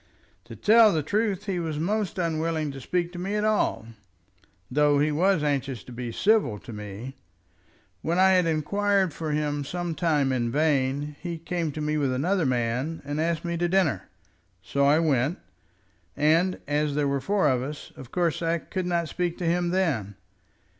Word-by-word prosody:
"To -, -, -10 dB
tell 220 Hz, 0 st, +6 dB
the 155 Hz, -4 st, 0 dB
truth 205 Hz, +3 st, -1 dB
he 190 Hz, -4 st, -1 dB
was 160 Hz, -3 st, -3 dB
most 205 Hz, +5 st, -1 dB
unwilling 160 Hz, -3 st, -1 dB
to 135 Hz, -1 st, -9 dB
speak 175 Hz, +5 st, -1 dB
to 175 Hz, -, -6 dB
me 195 Hz, +3 st, -2 dB
at 210 Hz, -, 0 dB
all, 215 Hz, -, +1 dB, 0.9 s
though 145 Hz, +1 st, +3 dB
he 150 Hz, +2 st, +2 dB
was 180 Hz, +2 st, +2 dB
anxious 135 Hz, -5 st, -1 dB
to -, -, -12 dB
be 120 Hz, 0 st, -5 dB
civil 195 Hz, -, +2 dB
to 115 Hz, -, -10 dB
me. 105 Hz, +5 st, -8 dB, 0.8 s
When 170 Hz, +2 st, -1 dB
I 190 Hz, +1 st, +6 dB
had 180 Hz, -2 st, +4 dB
inquired 190 Hz, +3 st, +1 dB
for 160 Hz, -2 st, -4 dB
him 150 Hz, -1 st, -1 dB
some 175 Hz, +3 st, -3 dB
time 150 Hz, -5 st, +1 dB
in 120 Hz, -2 st, 0 dB
vain, 145 Hz, 0 st, 0 dB
he 170 Hz, -2 st, -5 dB
came 165 Hz, -1 st, -3 dB
to 155 Hz, -, -5 dB
me 150 Hz, 0 st, 0 dB
with 140 Hz, -3 st, +1 dB
another 165 Hz, +5 st, +1 dB
man, 125 Hz, +6 st, -1 dB
and 145 Hz, +2 st, -2 dB
asked 165 Hz, 0 st, -1 dB
me 170 Hz, 0 st, -2 dB
to 175 Hz, +1 st, 0 dB
dinner. 185 Hz, -5 st, +1 dB, 0.5 s
So 140 Hz, +8 st, +1 dB
I 145 Hz, +2 st, +5 dB
went, 150 Hz, -1 st, +1 dB, 0.8 s
and 165 Hz, +5 st, +2 dB
as 145 Hz, 0 st, 0 dB
there 145 Hz, -1 st, +1 dB
were 140 Hz, -1 st, 0 dB
four 200 Hz, -2 st, +2 dB
of 130 Hz, -3 st, +2 dB
us, 145 Hz, +3 st, -7 dB
of 130 Hz, -, -11 dB
course 175 Hz, -3 st, 0 dB
I 165 Hz, 0 st, +1 dB
could 185 Hz, +2 st, -4 dB
not 170 Hz, -2 st, 0 dB
speak 175 Hz, +1 st, -2 dB
to 180 Hz, -, -4 dB
him 175 Hz, +1 st, +1 dB
then. 145 Hz, -, 0 dB
160 Hz, 185 wpm, -26 LUFS, 140-180 Hz, 0.9 s, tell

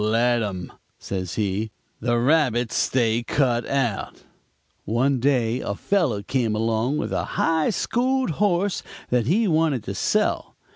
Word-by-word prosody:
"'Let 115 Hz, +2 st, +2 dB
him,' 95 Hz, -5 st, -4 dB, 0.2 s
says 95 Hz, -3 st, -4 dB
he; 105 Hz, +1 st, -1 dB, 0.3 s
'the 120 Hz, +1 st, +1 dB
rabbits 125 Hz, -3 st, +2 dB
stay 115 Hz, -2 st, +2 dB
cut 120 Hz, -1 st, 0 dB
out.' 125 Hz, -7 st, -2 dB, 0.6 s
"One 130 Hz, +5 st, +1 dB
day 125 Hz, -2 st, +1 dB
a 100 Hz, -, -3 dB
fellow 145 Hz, -, 0 dB
came 115 Hz, -1 st, 0 dB
along 115 Hz, +5 st, 0 dB
with -, -, -3 dB
a -, -, 0 dB
high 160 Hz, -1 st, +2 dB
schooled 255 Hz, +3 st, 0 dB
horse 195 Hz, -1 st, +1 dB, 0.3 s
that 120 Hz, -2 st, +2 dB
he 210 Hz, +8 st, +3 dB
wanted 155 Hz, -, +1 dB
to 100 Hz, -, -5 dB
sell. -, -, 0 dB
120 Hz, 140 wpm, -23 LUFS, 110-150 Hz, 0.6 s, he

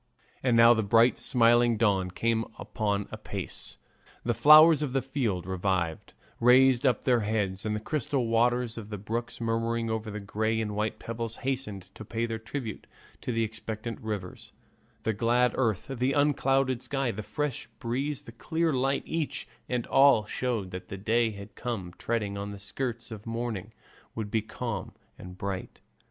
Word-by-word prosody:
And 125 Hz, -3 st, +3 dB
now 115 Hz, +1 st, +8 dB
bright 115 Hz, +2 st, +4 dB
smiling 120 Hz, -1 st, +4 dB
dawn 100 Hz, -4 st, +2 dB
came 115 Hz, +4 st, 0 dB, 0.3 s
on 105 Hz, -2 st, 0 dB
apace; -, -, -5 dB, 0.5 s
the 120 Hz, -, +1 dB
flowers 150 Hz, +6 st, +8 dB
of 140 Hz, -4 st, -2 dB
the 135 Hz, -, +2 dB
field, 120 Hz, -, -1 dB
revived, 90 Hz, -3 st, -1 dB, 0.3 s
raised 130 Hz, +1 st, +5 dB
up 125 Hz, -, +1 dB
their 125 Hz, -2 st, +4 dB
heads, 105 Hz, -2 st, -1 dB
and 105 Hz, -, 0 dB
the -, -, -2 dB
crystal 135 Hz, +1 st, -1 dB
waters 120 Hz, +1 st, +1 dB
of 105 Hz, -2 st, -9 dB
the 105 Hz, -, -4 dB
brooks, 115 Hz, +4 st, -4 dB
murmuring 115 Hz, 0 st, -1 dB
over 110 Hz, 0 st, -3 dB
the 105 Hz, 0 st, -5 dB
grey 110 Hz, +2 st, -1 dB
and 105 Hz, -2 st, -2 dB
white 110 Hz, +1 st, -1 dB
pebbles, 115 Hz, 0 st, -5 dB
hastened 130 Hz, -8 st, -2 dB
to -, -, -9 dB
pay 115 Hz, +2 st, -2 dB
their 115 Hz, -1 st, -4 dB
tribute 110 Hz, -1 st, -6 dB, 0.3 s
to -, -, -3 dB
the 115 Hz, -1 st, +1 dB
expectant 110 Hz, +1 st, -5 dB
rivers; 105 Hz, -5 st, -6 dB, 0.5 s
the 110 Hz, -1 st, +1 dB
glad 120 Hz, +4 st, +2 dB
earth, 110 Hz, -8 st, 0 dB
the 130 Hz, 0 st, -1 dB
unclouded 135 Hz, -3 st, +2 dB
sky, 135 Hz, -3 st, -1 dB
the 110 Hz, -, -5 dB
fresh 125 Hz, +6 st, -3 dB
breeze, 135 Hz, +5 st, -2 dB
the -, -, -11 dB
clear 160 Hz, +7 st, -1 dB
light, 135 Hz, +1 st, +1 dB
each 160 Hz, -2 st, -3 dB, 0.2 s
and 125 Hz, -2 st, -1 dB
all 135 Hz, -6 st, +5 dB
showed 110 Hz, -5 st, -2 dB
that 90 Hz, 0 st, -7 dB
the 95 Hz, -, -6 dB
day 115 Hz, +4 st, +2 dB
that 100 Hz, 0 st, -10 dB
came 110 Hz, -8 st, -4 dB
treading 105 Hz, -4 st, -2 dB
on 100 Hz, 0 st, -4 dB
the 100 Hz, -, -7 dB
skirts 115 Hz, +4 st, -4 dB
of 110 Hz, 0 st, -8 dB
morning 115 Hz, -3 st, -3 dB, 0.4 s
would 110 Hz, -2 st, -4 dB
be 110 Hz, -, +2 dB
calm 110 Hz, -2 st, -5 dB, 0.3 s
and 90 Hz, 0 st, -10 dB
bright. 95 Hz, -1 st, -5 dB
115 Hz, 170 wpm, -28 LUFS, 105-125 Hz, 0.5 s, now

